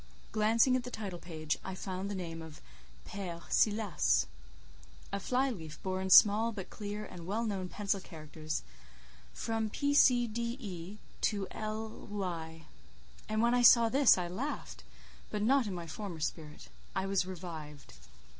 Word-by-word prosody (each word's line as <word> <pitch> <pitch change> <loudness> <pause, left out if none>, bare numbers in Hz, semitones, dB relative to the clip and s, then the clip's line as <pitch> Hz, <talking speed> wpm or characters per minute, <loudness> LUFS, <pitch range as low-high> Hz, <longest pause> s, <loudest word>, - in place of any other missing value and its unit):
Glancing 225 +4 +4
at 255 - 0
the 250 - -6
title 200 -7 -5
page, 155 -3 -3
I 190 - -5
found 190 +1 -4
the 205 - -3
name 165 -3 -5
of 160 -1 -10 0.5
"Père 175 -4 -6
Silas." 205 - +3 0.9
A 200 - 0
fly 260 +6 +1
leaf 160 -8 -7
bore 185 0 -1
in 190 - -2
small, 215 +4 +7
but 200 -4 -7
clear 210 0 -5
and 175 -3 -9
well 220 +4 -1
known 190 -4 -2
pencil 200 0 -1
characters: 155 - -6 0.7
"From 225 - -2
P. 285 +6 0
C. 250 -4 +6
D. 235 +2 -3
E. 190 -3 -7 0.2
to 200 -3 0
L—y." 200 -7 -5 0.6
And 215 +1 +1
when 235 +1 +4
I 245 - +4
saw 235 -1 +8
this 270 -2 +6
I 180 -1 -1
laughed: 180 +2 -5 0.5
but 210 - -2
not 260 +1 +4
in 195 - -3
my 170 -1 -5
former 175 0 -6
spirit. 155 -1 -5 0.3
I 190 - 0
was 195 -2 +1
revived. 160 - -8
195 Hz, 155 wpm, -32 LUFS, 170-220 Hz, 0.9 s, saw